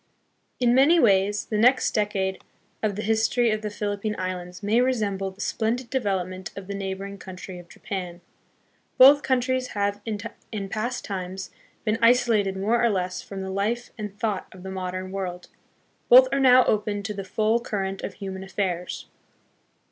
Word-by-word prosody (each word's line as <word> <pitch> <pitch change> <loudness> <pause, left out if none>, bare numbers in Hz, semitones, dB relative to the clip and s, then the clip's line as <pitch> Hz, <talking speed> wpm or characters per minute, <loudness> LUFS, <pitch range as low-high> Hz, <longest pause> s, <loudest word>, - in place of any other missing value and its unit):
In 240 -1 +3
many 285 +7 +5
ways 205 -3 +3
the 215 -2 -2
next 250 +4 +4
decade 200 -3 -1 0.4
of 210 -2 0
the 210 - -4
history 225 +2 +2
of 215 0 -1
the 210 - -3
Philip 205 -1 -3
pine 215 0 -2
Islands 180 0 -5
may 220 +4 +3
resemble 205 -7 0
the 190 +2 -11
splendid 235 +3 -1
development 190 -7 -2
of 195 - -7
the 200 - -5
neighboring 195 0 -5
country 185 -1 -9
of 175 -1 -14
Japan. 180 -3 -6 0.8
Both 280 +3 +9
countries 255 -1 0
have 205 0 0
in 210 -2 -6
past 240 +5 -3
times 190 -1 -5 0.3
been 220 +1 +1
isolated 230 -5 +3
more 225 +5 +1
or 235 - +4
less 185 -3 -2
from 195 -1 -7
the 190 - -5
life 220 +5 -1
and 210 -3 -7
thought 215 -4 -2
of 185 -1 -13
the 190 - -6
modern 185 0 -4
world. 180 -2 -5 0.6
Both - - +9
are - - +1
now 255 -1 +6
open 210 -1 0
to 210 +1 -3
the 195 -1 -5
full 215 +4 +1
current 195 -4 -3
of - - -5
human 190 -1 -6
affairs. 185 -2 -3
205 Hz, 170 wpm, -25 LUFS, 190-230 Hz, 0.8 s, Both